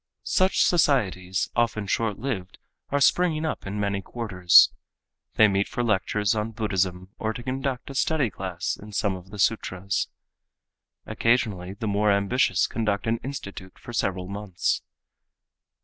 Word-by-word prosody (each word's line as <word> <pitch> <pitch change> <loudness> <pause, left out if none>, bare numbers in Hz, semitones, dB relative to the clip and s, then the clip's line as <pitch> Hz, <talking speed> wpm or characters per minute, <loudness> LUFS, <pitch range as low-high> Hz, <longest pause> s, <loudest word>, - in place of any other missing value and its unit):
Such 185 0 +3
societies, 95 - +1
often 115 -3 +1
short 105 +1 -1
lived, 105 -8 -4 0.3
are 145 - +1
springing 160 +1 +3
up 155 - -4
in 100 +1 -4
many 100 -1 -1
quarters. 95 -7 +5 0.6
They 110 - +7
meet 100 0 +1
for 120 - -2
lectures 105 -1 +1
on 110 +1 -2
Buddhism 95 -4 -1
or 110 0 -1
to 120 - -7
conduct 130 0 -3
a - - -7
study 135 -3 +1
class 90 -2 -3
in 105 0 -11
some 100 -1 0
of 90 0 -11
the 105 - -9
sutras. 100 -2 0 1.0
Occasionally 105 -6 0
the 100 - -6
more 105 +1 +2
ambitious 100 -2 +2
conduct 105 -3 -1
an 115 +1 +1
institute 100 -8 -8
for 120 - -10
several 95 -4 -1
months. 100 -2 -2
105 Hz, 145 wpm, -25 LUFS, 95-120 Hz, 1.0 s, They